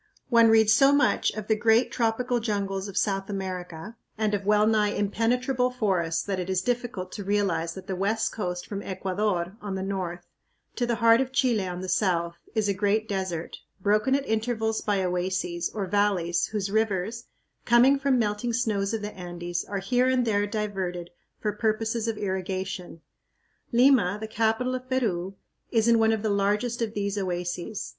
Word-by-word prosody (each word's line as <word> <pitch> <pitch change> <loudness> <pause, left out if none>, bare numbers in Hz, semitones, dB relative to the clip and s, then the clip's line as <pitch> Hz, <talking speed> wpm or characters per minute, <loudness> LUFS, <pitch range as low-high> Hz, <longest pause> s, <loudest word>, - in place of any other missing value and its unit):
One 230 -2 +6
reads 220 -1 +5
so 275 +5 +6
much 285 +1 +3
of 215 -2 -5
the 220 - +2
great 225 +3 +3
tropical 240 +1 0
jungles 200 -3 -2
of 200 -1 -7
South 195 -1 0
America 185 +1 -5 0.2
and 215 -1 0
of 200 -1 -2
wellnigh 210 0 +4
impenetrable 250 +5 +1
forests 185 -9 0
that 195 -2 -2
it 180 0 -4
is 185 -1 0
difficult 240 -6 -2
to 205 - -6
realize 195 -5 0
that 190 - -9
the 190 -1 -3
West 220 +4 0
Coast 180 -4 -4
from 200 -1 -5
Ecuador, 190 -1 -2
on 205 -2 -4
the 190 - -3
north, 190 -3 -4 0.5
to 245 - 0
the 235 - +1
heart 230 +1 +5
of 260 -1 -2
Chile, 235 -7 +1
on 180 0 -5
the 185 - -5
south, 170 -3 0 0.2
is 215 -2 +1
a 200 - +2
great 205 +3 +1
desert, 185 -5 -3 0.2
broken 210 +7 +2
at 280 0 -1
intervals 220 0 -1
by 200 -2 0
oases, 180 -1 -1
or 205 -2 -3
valleys 185 -3 +1
whose 205 -2 -3
rivers, 220 +1 -1 0.4
coming 250 +4 +5
from 275 -1 +2
melting 220 +1 -1
snows 220 -3 0
of 215 - -5
the 210 - -5
Andes, 175 -1 -4
are 200 - -4
here 245 +6 +1
and 255 -1 +2
there 205 -2 +1
diverted 190 -5 -3 0.3
for 210 - -1
purposes 220 +2 -1
of 225 -2 -2
irrigation. 190 -3 -4 0.7
Lima, 240 -6 +4
the 220 - -5
capital 225 +3 0
of 255 0 -5
Peru, 195 -8 -1 0.3
is 225 -1 +2
in 230 -1 +5
one 220 0 +4
of 220 -1 -1
the 220 - +1
largest 210 +4 0
of 225 -1 -2
these 200 0 -1
oases. 180 +2 -3
205 Hz, 180 wpm, -26 LUFS, 190-225 Hz, 0.7 s, One